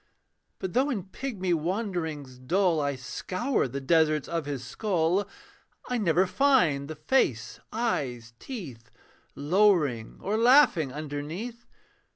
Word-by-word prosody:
But 190 -2 -5
though 260 +5 +2
in 215 -9 -2
pigmy 190 -6 -2
wanderings 160 - -3
dull 170 +4 +1
I 140 -1 -1
scour 185 - -2
the 135 +3 -5
deserts 155 +1 +2
of 165 -3 -3
his 135 -3 -4
skull, 185 - 0 0.6
I 250 -1 0
never 185 -2 +3
find 185 - +2
the 155 - -6
face, 150 - 0
eyes, 130 - -2
teeth. 135 - -8 0.5
Lowering 150 - +2
or 205 +3 -1
laughing 230 - +5
underneath. 155 - -6
170 Hz, 120 wpm, -27 LUFS, 140-210 Hz, 0.6 s, laughing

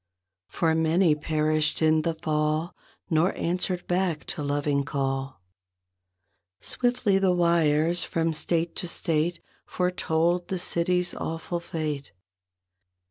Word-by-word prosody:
For 165 -2 +1
many 160 +1 +3
perished 155 0 0
in 155 0 +3
the 165 +1 -1
fall 155 +1 -1 0.4
Nor 160 +4 +2
answered 180 +1 -1
back 175 -3 0
to 175 - -6
loving 145 0 0
call. 135 -4 -3 1.2
Swiftly 245 -5 +1
the 190 -1 +3
wires 170 -1 +2
from 165 0 -1
state 165 +2 0
to 175 - -2
state 165 0 +1 0.3
1 - - -52
5 - - -22
Foretold 175 -1 +1
the 190 - -2
city's 180 0 0
awful 165 +2 -4
fate. 155 -4 -4
165 Hz, 120 wpm, -26 LUFS, 155-175 Hz, 1.2 s, many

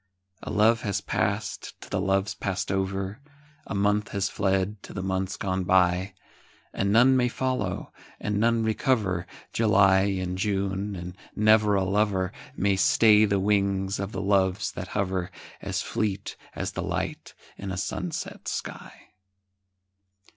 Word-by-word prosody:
A - - -7
love 115 +2 +3
has 100 -2 -1
passed - - -2
to - - -10
the 100 - 0
loves 95 +2 +1
passed 95 -2 -3
over, 95 +2 -2 0.5
A - - -4
month 105 +2 +1
has 100 -1 0
fled 95 +1 0
to - - -11
the 95 - -4
months 95 0 -2
gone 95 -1 -1
by; 90 +1 +2 0.6
And 100 0 0
none 125 +5 +6
may 125 -1 +3
follow, 120 -6 -2 0.3
and 105 -1 -1
none 115 +1 +2
recover 110 - 0 0.3
July 100 -4 +5 0.2
and 90 0 -3
June, 100 0 -1
and 90 0 -7 0.2
never 105 -1 +4
a 95 - +2
lover 95 -1 +1 0.2
May 100 -5 +1
stay 110 +1 +5
the 100 -1 +1
wings 100 -1 +1
of 100 +1 -3
the 95 - -4
Loves 95 0 +2
that 95 - -6
hover, 95 -3 -1 0.3
As - - -2
fleet 100 -3 -2 0.2
as - - -3
the - - -4
light - - -4 0.2
in 100 - -6
a 90 - -4
sunset - - -4
sky. - - -6
100 Hz, 145 wpm, -26 LUFS, 95-105 Hz, 0.6 s, none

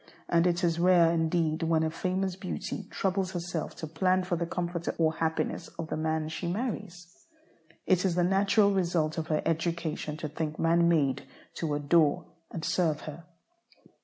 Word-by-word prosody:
And 170 +1 +3
it 175 +1 0
is 170 -1 +1
rare 175 -2 +5
indeed 160 -1 +1
when 165 -1 +2
a 160 - 0
famous 185 +2 -1
beauty 185 -1 -5
troubles 190 -1 -1
herself 175 -2 -4
to - - -6
plan 185 +4 +1
for 180 -1 -1
the 170 0 -2
comfort 175 -1 -3
or 160 -1 +2
happiness 160 +1 -2
of 165 -1 -5
the - - -2
man 155 0 -1
she 160 +3 -4
marries. 185 - -5 0.6
It 185 -2 +3
is 185 -3 +1
the 175 - +2
natural 200 +3 +3
result 170 -4 0
of 160 - -4
her 155 -1 0
education 165 -2 -2
to 155 - -4
think 155 +1 -4
man 170 +1 +3
made 140 -5 +1 0.3
to 155 -3 -2
adore 155 +2 +3 0.2
and 165 - -5
serve 160 -4 +1
her. 155 +2 -9
170 Hz, 170 wpm, -29 LUFS, 160-180 Hz, 0.6 s, rare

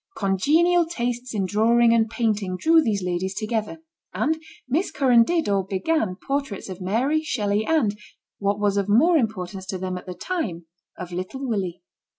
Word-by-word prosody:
Congenial 320 - +3
tastes 245 -5 -3
in 195 -2 0
drawing 230 +4 +4
and 225 -1 +2
painting 210 -5 -1
drew 325 - +5
these 210 -9 -1
ladies 180 +2 -2
together, 225 +8 -3 0.3
and 305 +11 0 0.3
Miss 310 +10 0
Curran 265 -6 +4
dirt 335 +5 0
or 200 -1 +1
began 195 - -1
portraits 275 -3 -4
of 185 0 -7
Mary, 250 +12 +1
Shelley, 215 -8 -1
and, 275 -11 +2 0.4
what 200 0 0
was 205 -1 +1
of 200 0 0
more 305 +12 +5
importance 195 - -2
to 190 - -3
them 185 0 -4
at - - -17
the 180 - -6
time, 185 - -3 0.3
of 180 -1 -7
little 185 +10 -5
Willie. 185 -6 -3
215 Hz, 165 wpm, -24 LUFS, 190-275 Hz, 0.4 s, drew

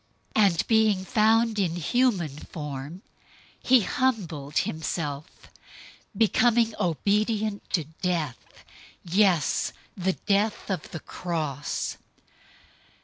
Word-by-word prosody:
002:008 215 - +5
And 170 -4 0
being 215 -4 +3
found 225 0 +3
in 175 -4 0
human 175 - +1
form, 150 +4 -7 0.6
he 255 -1 +5
humbled 185 - -1
himself, 155 -2 -2 0.9
becoming 230 +1 +3
obedient 210 +4 0
to 170 - +1 0.2
death, 165 -8 -3 0.4
yes, 180 -3 +2 0.2
the 190 0 0
death 205 +2 0
of 190 - -3
the 160 - -7
cross. 155 -5 -3
190 Hz, 90 wpm, -26 LUFS, 160-220 Hz, 0.9 s, 002:008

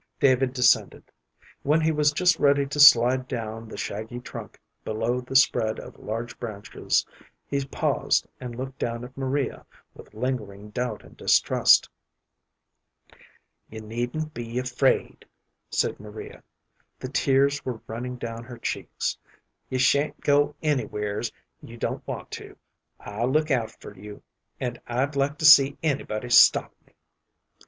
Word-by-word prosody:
David 130 -1 +3
descended. 125 -1 +2 0.6
When 150 +3 +2
he 160 0 +2
was 150 -1 +3
just 180 +2 +2
ready 140 0 +3
to 140 +2 -5
slide 130 -2 +7
down 115 -3 -5
the - - -9
shaggy 110 +4 -5
trunk 125 - -9 0.2
below 115 +3 -1
the 130 +2 -8
spread 115 -4 +3
of - - -11
large 115 +2 -5
branches, 105 -4 -2 0.4
he 140 0 -2
paused - - 0
and 125 -2 -7
looked 130 +2 -7
down 115 0 -3
at 125 +1 -10
Maria 135 0 -2 0.3
with - - -15
lingering 105 -4 -4
doubt 120 -1 -3
and - - -16
distrust. - - +4 1.8
"You 110 0 -8
needn't 120 +8 -4
be 120 0 -6
afraid," 125 +1 0 0.4
said - - -1
Maria. 105 +1 -10 0.6
The 130 - -6
tears 140 +1 +2
were 125 -4 -5
running 125 +3 -5
down 115 -1 -6
her 120 -1 -10
cheeks. - - -3 0.5
"You 130 - -2
sha'n't 140 +3 +2
go 145 0 +2
anywheres 110 -6 -1 0.3
you - - -11
don't - - -4
want - - -6
to. - - -13 0.4
I'll 110 +5 -3
look 155 +2 +1
out 120 -4 +1
for - - -11
you, 105 +2 -11 0.4
and 125 -2 -4
I'd 130 +4 -1
like 140 +1 0
to 155 - -2
see 140 -2 +8
anybody 125 -6 -2
stop - - +6
me." - - -29
125 Hz, 140 wpm, -25 LUFS, 115-140 Hz, 1.8 s, see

